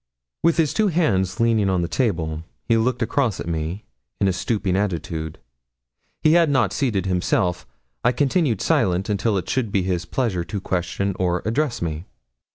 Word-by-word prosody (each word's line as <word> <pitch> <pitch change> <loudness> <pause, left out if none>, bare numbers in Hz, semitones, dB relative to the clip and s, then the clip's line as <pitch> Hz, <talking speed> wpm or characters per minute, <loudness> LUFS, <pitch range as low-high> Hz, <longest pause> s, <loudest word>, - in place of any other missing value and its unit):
With 170 0 +3
his 160 -4 +2
two 215 -1 +2
hands 100 - +1
leaning 115 -4 +3
on 90 -2 +1
the - - -1
table, 80 - -1 0.3
he 115 - +4
looked 120 +2 +1
across 115 -3 0
at - - -5
me, 85 +4 -3 0.3
in 100 - +3
a 95 - +2
stooping 100 -2 -1
attitude; 80 -5 -2 0.9
he 155 - +5
had 170 -2 +5
not 125 -9 +2
seated 110 -10 0
himself. 90 -1 0 0.4
I 125 - +4
continued 135 - +1
silent 95 +1 +1
until 105 +1 +1
it 90 - -3
should 120 -6 -1
be 100 -2 +1
his 90 -2 -1
pleasure 100 -5 -1
to 100 +3 -4
question 95 +1 -2
or 90 -1 0
address 120 - 0
me. 80 +1 -3
100 Hz, 170 wpm, -22 LUFS, 90-125 Hz, 0.9 s, he